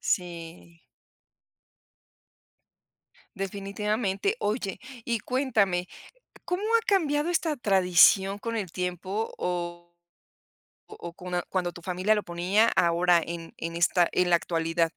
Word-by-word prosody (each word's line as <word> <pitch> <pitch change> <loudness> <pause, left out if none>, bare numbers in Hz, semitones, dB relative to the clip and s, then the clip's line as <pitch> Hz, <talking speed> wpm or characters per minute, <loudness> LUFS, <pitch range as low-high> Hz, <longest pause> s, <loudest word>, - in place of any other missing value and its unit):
Sí. 170 -1 -4 2.5
Definitivamente. 200 - -2
Oye, 210 - -2 0.3
y 235 -2 0
cuéntame, 215 -8 0 0.6
¿cómo 360 +3 -2
ha - - +2
cambiado 310 -5 +1
esta 320 -3 0
tradición 195 -1 +4
con 230 +2 -4
el 190 -6 -3
tiempo 185 +4 -3
o 175 -1 -4 1.0
o 170 - -8
cona 180 0 -4
cuando 180 -2 -1
tu 175 - -11
familia 185 +4 +1
lo 210 - -2
ponía 185 +6 +2
ahora 170 0 +4
en 165 -1 -7
en 165 +1 -5
esta 175 +1 +3
en 180 -1 +2
la 170 - +5
actualidad. 165 0 0
185 Hz, 110 wpm, -27 LUFS, 175-215 Hz, 2.5 s, la